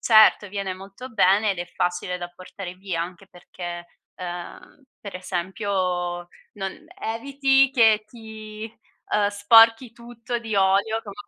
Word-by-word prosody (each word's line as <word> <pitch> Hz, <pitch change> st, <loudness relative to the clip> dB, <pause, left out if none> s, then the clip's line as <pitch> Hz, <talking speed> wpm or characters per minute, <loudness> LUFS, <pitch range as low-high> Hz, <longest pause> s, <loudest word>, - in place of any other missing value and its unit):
Certo, 215 Hz, -2 st, +6 dB
viene 195 Hz, -1 st, -3 dB
molto 195 Hz, +6 st, -10 dB
bene 205 Hz, -1 st, +4 dB
ed 190 Hz, -, -3 dB
è 175 Hz, -, -4 dB
facile 180 Hz, +1 st, -2 dB
da 175 Hz, -, -5 dB
portare 185 Hz, 0 st, -8 dB
via, 185 Hz, -3 st, -4 dB
anche 180 Hz, +2 st, -9 dB
perché, 175 Hz, -1 st, -8 dB, 0.3 s
uhm, 185 Hz, -, -8 dB, 0.2 s
per 200 Hz, -, -9 dB
esempio 185 Hz, -1 st, -2 dB, 0.2 s
non 195 Hz, +9 st, -6 dB, 0.2 s
eviti 270 Hz, +3 st, +2 dB
che 220 Hz, -5 st, +4 dB
ti, 220 Hz, -1 st, -9 dB, 0.4 s
uhm, 205 Hz, -1 st, +3 dB
sporchi 225 Hz, +3 st, +5 dB
tutto 240 Hz, 0 st, -6 dB
di 225 Hz, -2 st, -5 dB
olio, 200 Hz, +3 st, +3 dB
come 200 Hz, -2 st, -9 dB
200 Hz, 135 wpm, -24 LUFS, 185-225 Hz, 0.4 s, Certo